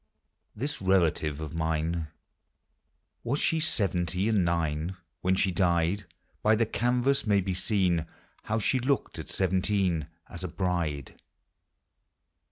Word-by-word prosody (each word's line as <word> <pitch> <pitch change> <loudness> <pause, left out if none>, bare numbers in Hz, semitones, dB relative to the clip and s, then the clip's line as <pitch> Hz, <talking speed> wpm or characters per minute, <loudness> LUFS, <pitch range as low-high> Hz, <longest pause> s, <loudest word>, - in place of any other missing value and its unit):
Tins 140 +3 -3
relative 85 -6 +2
of 80 -1 -6
mine. 80 0 -1 1.2
Was 135 +5 0
she 165 - +2
seveuty 95 - +1
and 105 -4 +3
nine 85 +1 -1 0.2
When 95 +1 +2
she 95 0 +2
died? 90 +2 +1 0.4
l$y 110 +1 +5
the 115 +1 +2
canvas 125 +3 +1
may 100 -1 +4
be 95 0 -1
seen 90 -4 +1 0.4
How 110 - 0
she 130 +4 +1
looked 135 +2 -1
at - - -7
seventeen, 95 -3 +1 0.2
As 85 - -7
a - - -1
bride. 85 -6 -2
95 Hz, 125 wpm, -28 LUFS, 85-105 Hz, 1.2 s, l$y